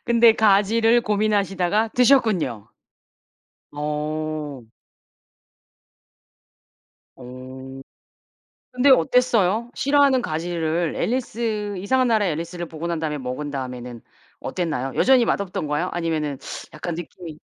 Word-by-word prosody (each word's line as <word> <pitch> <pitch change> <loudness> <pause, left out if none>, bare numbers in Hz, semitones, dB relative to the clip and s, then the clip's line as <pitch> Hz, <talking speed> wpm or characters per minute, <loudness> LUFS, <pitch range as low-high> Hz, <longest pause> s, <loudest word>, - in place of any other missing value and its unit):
근데 235 -1 +5
가지를 220 +2 +3
고민하시다가 205 -1 +1
드셨군요. 215 - +2 1.0
어. 150 -1 -4 2.6
어. 130 +1 -10 0.9
근데 255 +2 +3
어땠어요? 235 -1 +3
싫어하는 280 -2 +3
가지를 165 0 -2
앨리스 220 -4 -2
이상한 255 +7 +1
나라의 215 -6 +2
앨리스를 170 +2 -5
보고 160 +1 -6
난 170 -1 -2
다음에 155 -2 -2
먹은 130 +3 -5
다음에는 125 -3 -6 0.4
어땠나요? 150 -7 -3
여전히 260 -2 +4
맛없던가요? 175 -5 -1
아니면은 155 -5 -2 0.4
약간 160 +2 -5
느낌이 170 -1 -9
175 Hz, 260 characters per minute, -22 LUFS, 150-225 Hz, 2.6 s, 근데